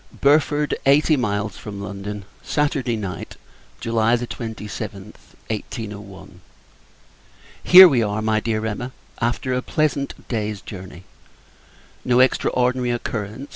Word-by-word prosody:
Burford, 150 +1 +3
Eighty 150 +3 +5
Miles 105 -5 -2
from 100 -2 -7
London. 100 0 -6 0.2
Saturday 140 -5 0
Night, 100 -4 -6 0.4
[July 115 0 +2
27th, 105 -4 -7 0.2
1801.] 105 -2 -7 1.2
Here 185 +1 +11
we 135 -8 +2
are, 105 -1 -1
my 110 0 +2
Dear 110 0 -2
Emma, 120 +4 -4 0.3
after 120 +2 -1
a 125 - 0
pleasant 145 -1 -2
day's 105 -3 -2
journey! 90 -2 -10 1.0
No 125 0 +3
extraordinary 125 -1 +2
occurrence. 115 +1 -4
115 Hz, 105 wpm, -22 LUFS, 105-130 Hz, 1.2 s, Here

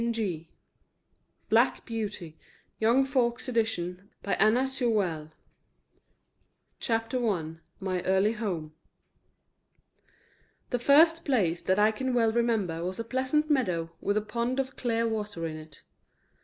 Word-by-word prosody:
zip) 175 -8 -3 1.0
BLACK - - +3
BEAUTY 205 -8 -5 0.4
YOUNG 235 +5 +4
FOLKS' 250 -3 0
EDITION 200 -5 -2
1902 245 +5 +2
BLACK 185 -7 0
BEAUTY 155 +1 -14 1.5
CHAPTER 230 +1 0
I 165 -5 -3 0.2
MY 185 -2 -2
EARLY 190 +3 +3
HOME 180 -9 -4 2.0
The 245 - 0
first 325 +6 +5
place 190 - +1
that 185 - +1
I 210 +1 +5
can 255 +3 -2
well 230 -2 +3
remember 220 -8 0
was 185 +3 -4
a - - -1
pleasant 260 +6 0
meadow 180 - 0
with 205 +1 0
a - - +2
pond 235 +5 -2
of 265 0 -2
clear 230 -2 0
water 210 -6 -3
in 160 -1 -4
it. 155 -2 -13
220 Hz, 125 wpm, -28 LUFS, 180-245 Hz, 2.0 s, first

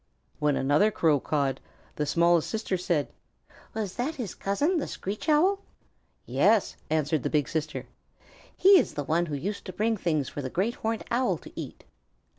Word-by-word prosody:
When 150 -2 +2
another 145 +10 +3
Crow 160 -8 +2
cawed, 140 -2 -1 0.4
the 150 - -1
smallest 170 +1 +3
sister 220 -3 -2
said, 170 -5 -1 0.6
"Was 210 -4 -3
that 275 +6 -1
his 235 - -5
cousin, 290 - 0
the - - -3
Screech 205 - -5
Owl?" 365 +7 +4 0.7
"Yes," - - +3
answered 155 -1 +1
the - - -1
big 150 -3 +1
sister. 155 -1 -3 0.7
"He 390 0 +8
is - - -2
the 145 - -2
one 165 +4 +1
who 150 - -3
used 200 +9 -4
to 185 - -6
bring 220 +4 0
things 155 -7 0
for 145 - -5
the 130 - -4
Great 200 - 0
Horned 225 -2 -3
Owl 250 +2 +2
to - - -13
eat." - - -7
175 Hz, 175 wpm, -27 LUFS, 150-225 Hz, 0.7 s, He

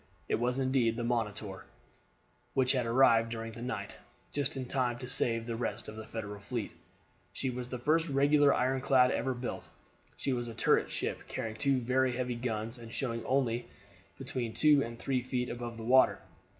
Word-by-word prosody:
It - - 0
was 125 +2 0
indeed 130 -4 +2
the 120 - -3
Monitor, 105 -5 -2 0.9
which 130 -1 +4
had 125 -4 +1
arrived 115 -2 +5
during 115 0 -5
the 115 - -9
night, 110 -5 -4 0.3
just 140 -1 -1
in 130 - -3
time 125 -2 0
to 125 0 -7
save 115 -2 +1
the 115 - -3
rest 120 - -3
of 110 - -7
the 110 0 -8
Federal 105 -2 -6
fleet. 115 +1 -4 0.6
She 130 - -2
was 125 0 -5
the 125 - -3
first 155 +6 +2
regular 145 +1 +5
ironclad 130 0 +3
ever 130 -1 -1
built. 120 0 -5 0.5
She 135 - -1
was 120 -1 -2
a 115 - -7
turret - - +3
ship, - - -3
carrying 110 -1 -4
two 135 +2 +2
very 130 +1 +2
heavy 125 -1 -1
guns, 115 0 -3
and 115 -1 -10
showing 115 -2 -2
only 125 -3 +1 0.5
between 120 -3 -4
two 150 -2 +5
and 115 -2 -4
three 130 +1 -1
feet 125 0 -2
above 120 -1 -5
the 115 - -7
water. 130 +3 +5
125 Hz, 185 wpm, -31 LUFS, 115-130 Hz, 0.9 s, arrived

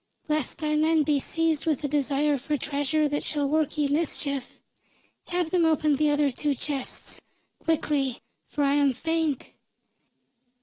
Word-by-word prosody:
Lest 305 -4 0
thy 305 -1 0
men 315 0 +3
be 290 -1 +2
seized 325 +1 0
with 305 -2 +1
a - - +1
desire 290 +1 +1
for 295 +3 -1
treasure 290 +2 0
that 290 0 -2
shall 290 -2 -1
work 310 +1 0
ye 295 -1 +2
mischief, 280 -3 -1 0.7
have 350 -2 -1
them 360 -2 +3
open 310 -2 +3
the 300 +1 +3
other 290 -1 +2
two 285 +3 -1
chests. 275 0 -3 0.4
Quickly, 290 -5 +1 0.3
for 290 - -1
I 280 0 +3
am 285 -2 +3
faint." 320 +1 -1
295 Hz, 150 wpm, -26 LUFS, 280-315 Hz, 0.7 s, men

